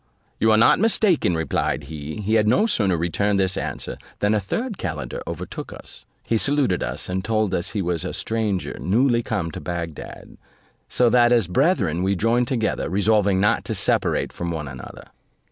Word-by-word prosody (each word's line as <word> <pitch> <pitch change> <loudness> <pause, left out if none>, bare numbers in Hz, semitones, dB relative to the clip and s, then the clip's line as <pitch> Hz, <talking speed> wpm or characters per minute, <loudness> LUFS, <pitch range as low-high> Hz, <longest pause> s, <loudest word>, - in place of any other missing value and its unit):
"You 110 - +3
are 110 - +5
not 115 - +5
mistaken," 195 - +3
replied 80 -2 -1
he. 75 +5 -7
He 105 +2 -1
had 110 -1 +3
no 160 - +4
sooner 100 - +1
returned 100 +5 0
this 95 -1 +1
answer, - - -5 0.2
than 105 +1 +1
a 105 - +2
third 215 - -4
calender 80 -5 -4
overtook - - -6
us. - - -11 0.2
He 115 - 0
saluted 140 -10 +1
us, - - -4
and 95 +1 -2
told 110 -2 0
us 85 +2 -2
he 100 -3 -1
was 85 -2 -2
a - - -3
stranger 110 -5 -2
newly 120 +4 +2
come 100 -8 -3
to - - -7
Bagdad; 85 -3 -7 0.5
so 125 - +3
that 120 -1 +5
as 115 -7 +3
brethren 95 - +1
we 95 +2 +1
joined 115 +5 +1
together, 115 -4 -1
resolving 100 -1 +2
not 105 +2 +2
to - - -3
separate - - +1
from 85 - -4
one 80 -3 -4
another. 65 -2 -9
105 Hz, 180 wpm, -22 LUFS, 90-115 Hz, 0.5 s, are